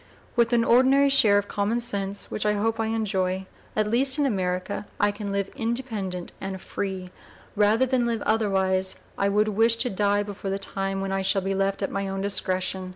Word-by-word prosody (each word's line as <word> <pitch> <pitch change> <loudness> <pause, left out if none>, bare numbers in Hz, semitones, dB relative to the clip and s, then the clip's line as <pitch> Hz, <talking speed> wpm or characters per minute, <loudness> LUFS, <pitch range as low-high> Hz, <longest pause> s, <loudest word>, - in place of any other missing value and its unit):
With 235 -1 +3
an 235 -1 +4
ordinary 260 +4 +5
share 225 -7 +5
of 205 0 0
common 210 +3 0
sense, 200 -4 -3
which - - -2
I 210 0 +2
hope 225 +2 -1
I 225 - 0
enjoy, 190 -4 -1 0.3
at 215 - +2
least 260 +6 +2
in 290 - +2
America 190 -3 -2
I 205 0 +3
can 205 -1 -5
live 200 -1 -2
independent 225 -7 -3
and 190 0 -4
free; 190 0 -4
and 180 0 -11 0.4
rather 215 +4 +3
than 255 -2 +1
live 230 -2 -1
otherwise 190 -3 +1
I 200 - +1
would 210 +2 +2
wish 225 +3 +4
to 245 +2 0
die 205 +1 +1
before 200 -1 -6
the 195 - -1
time 195 0 -3
when 195 0 -3
I 195 0 0
shall 190 0 +1
be 195 +1 -1
left 195 +1 0
at - - -2
my 195 0 -2
own 195 0 -3
discretion. 185 -1 -1
205 Hz, 205 wpm, -25 LUFS, 195-225 Hz, 0.4 s, ordinary